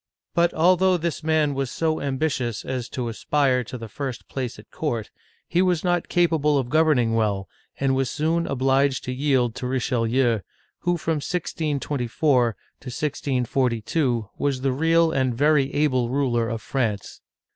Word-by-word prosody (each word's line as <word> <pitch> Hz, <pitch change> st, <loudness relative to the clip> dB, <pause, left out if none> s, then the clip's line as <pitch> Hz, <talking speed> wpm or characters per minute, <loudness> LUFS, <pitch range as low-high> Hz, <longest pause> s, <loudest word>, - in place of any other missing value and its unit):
But 170 Hz, 0 st, +3 dB
al 180 Hz, +3 st, +5 dB
though 185 Hz, 0 st, +3 dB
this 170 Hz, -2 st, -3 dB
man 155 Hz, -2 st, +2 dB
was 135 Hz, -1 st, -2 dB
so 160 Hz, -1 st, -1 dB
ambitious 130 Hz, -5 st, -1 dB
as 130 Hz, -2 st, -3 dB
to 125 Hz, -2 st, -3 dB
aspire 130 Hz, +2 st, +1 dB
to 125 Hz, -, -7 dB
the 115 Hz, -1 st, -7 dB
first 130 Hz, +2 st, -6 dB
place 130 Hz, -3 st, -4 dB
at -, -, -15 dB
court, 120 Hz, -9 st, -3 dB, 0.4 s
he 175 Hz, -, +2 dB
was 180 Hz, -3 st, +1 dB
not 175 Hz, -2 st, 0 dB
capable 160 Hz, -4 st, +2 dB
of 130 Hz, -2 st, -2 dB
governing 150 Hz, -8 st, +3 dB
well, 105 Hz, -4 st, 0 dB, 0.3 s
and 135 Hz, -1 st, +2 dB
was 130 Hz, -1 st, 0 dB
soon 165 Hz, +3 st, 0 dB
obliged 135 Hz, 0 st, +1 dB
to 125 Hz, -, -4 dB
yield 130 Hz, -3 st, +1 dB
to 125 Hz, -, -4 dB
Richelieu, 125 Hz, -2 st, +1 dB, 0.4 s
who 175 Hz, 0 st, 0 dB
from 160 Hz, -1 st, -1 dB
1624 140 Hz, -, 0 dB, 0.2 s
to -, -, -13 dB
1642 125 Hz, -2 st, -1 dB
was 140 Hz, -2 st, 0 dB
the 135 Hz, 0 st, +1 dB
real 165 Hz, +4 st, +3 dB
and 130 Hz, -4 st, 0 dB
very 145 Hz, +1 st, +3 dB
able 130 Hz, -5 st, +1 dB
ruler 120 Hz, -4 st, +1 dB
of 115 Hz, -3 st, -4 dB
France. 110 Hz, -7 st, -2 dB
135 Hz, 155 wpm, -24 LUFS, 125-155 Hz, 0.4 s, al